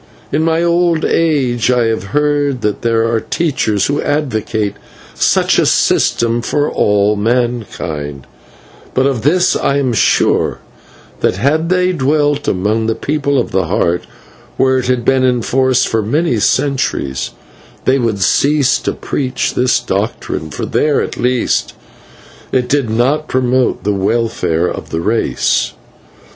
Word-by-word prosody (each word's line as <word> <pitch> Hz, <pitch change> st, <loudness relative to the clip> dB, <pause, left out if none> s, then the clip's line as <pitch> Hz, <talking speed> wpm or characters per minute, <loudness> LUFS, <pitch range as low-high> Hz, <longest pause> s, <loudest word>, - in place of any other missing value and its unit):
In 150 Hz, -, +1 dB
my 165 Hz, +1 st, +1 dB
old 170 Hz, -1 st, +2 dB
age 130 Hz, -8 st, +1 dB
I 125 Hz, -1 st, +3 dB
have 110 Hz, -4 st, -1 dB
heard 145 Hz, +1 st, 0 dB
that 105 Hz, -1 st, -2 dB
there 115 Hz, -1 st, +1 dB
are 115 Hz, 0 st, +1 dB
teachers 130 Hz, -, 0 dB
who 145 Hz, +1 st, -1 dB
advocate 110 Hz, -7 st, -1 dB, 0.4 s
such -, -, +2 dB
a -, -, +3 dB
system 115 Hz, 0 st, +2 dB
for 145 Hz, +5 st, 0 dB
all 105 Hz, 0 st, +2 dB
mankind, 105 Hz, -, -2 dB, 0.7 s
but 130 Hz, -, +2 dB
of 135 Hz, -5 st, 0 dB
this 175 Hz, +8 st, +2 dB
I 140 Hz, -, 0 dB
am 130 Hz, -4 st, 0 dB
sure, 110 Hz, -, +2 dB, 0.6 s
that -, -, +1 dB
had 155 Hz, +5 st, 0 dB
they 180 Hz, 0 st, +2 dB
dwelt 145 Hz, -2 st, 0 dB
among 105 Hz, +4 st, 0 dB
the 115 Hz, -, 0 dB
People 140 Hz, -1 st, -1 dB
of -, -, -1 dB
the 95 Hz, -1 st, +1 dB
Heart, 85 Hz, +2 st, 0 dB, 0.5 s
where 130 Hz, 0 st, +3 dB
it 125 Hz, -, -3 dB
had 125 Hz, -2 st, 0 dB
been 135 Hz, -1 st, +3 dB
in 125 Hz, -2 st, +1 dB
force 130 Hz, 0 st, +2 dB
for 110 Hz, -, 0 dB
many 125 Hz, +3 st, 0 dB
centuries, 105 Hz, -, 0 dB, 0.6 s
they 135 Hz, +1 st, +3 dB
would 110 Hz, -5 st, 0 dB
cease 140 Hz, +4 st, +2 dB
to -, -, -2 dB
preach 130 Hz, -2 st, -2 dB
this 125 Hz, -1 st, +2 dB
doctrine, 100 Hz, -8 st, -3 dB
for -, -, -5 dB
there, 150 Hz, -1 st, +1 dB
at -, -, -5 dB
least, 125 Hz, 0 st, 0 dB, 0.8 s
it 125 Hz, -1 st, +1 dB
did 135 Hz, -3 st, 0 dB
not 135 Hz, +7 st, +1 dB
promote 130 Hz, 0 st, 0 dB
the 105 Hz, -, 0 dB
welfare 95 Hz, -5 st, 0 dB
of -, -, -6 dB
the 80 Hz, -, -2 dB
race. 110 Hz, +6 st, 0 dB
125 Hz, 145 wpm, -15 LUFS, 110-145 Hz, 0.8 s, I